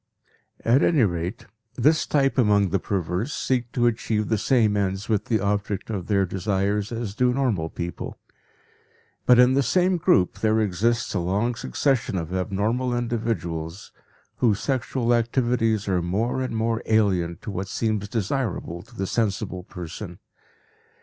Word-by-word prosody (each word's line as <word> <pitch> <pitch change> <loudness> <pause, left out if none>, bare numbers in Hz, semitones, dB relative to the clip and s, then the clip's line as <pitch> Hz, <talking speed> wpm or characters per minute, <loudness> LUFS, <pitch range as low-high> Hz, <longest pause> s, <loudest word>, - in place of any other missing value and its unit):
At 120 +5 +4
any 150 -7 +4
rate, 90 +2 -2 0.3
this 150 +6 +3
type 135 -2 +2
among 105 -4 +4
the 100 - +1
perverse 95 - -2
seek 125 -2 -1
to 120 - +2
achieve 110 -2 0
the 110 - +2
same 110 -4 +3
ends 100 0 -1
with 105 -3 0
the 110 -2 +1
object 100 +1 -2
of 95 -5 -4
their 100 -2 +2
desires 100 +3 -1
as 115 -3 -4
do 125 +3 +2
normal 120 -11 0
people. 85 +1 -6 1.1
But 125 - +7
in 125 +1 +6
the 140 - +3
same 180 +8 +2
group 165 - +2
there 110 0 +2
exists 110 +4 0
a 100 - 0
long 100 +7 0
succession 125 -3 0
of 85 0 -4
abnormal 110 +7 0
individuals 105 -8 -3 0.5
whose 105 -5 +2
sexual 130 -2 0
activities 115 -2 +1
are 90 -2 +1
more 105 +9 -1
and 125 -3 -2
more 115 0 0
alien 95 -6 +2
to - - -5
what 95 0 -4
seems 110 0 -1
desirable 105 -6 -2
to 105 - -18
the 95 - -2
sensible 100 -3 -1
person. 90 +1 -8
110 Hz, 150 wpm, -24 LUFS, 95-120 Hz, 1.1 s, But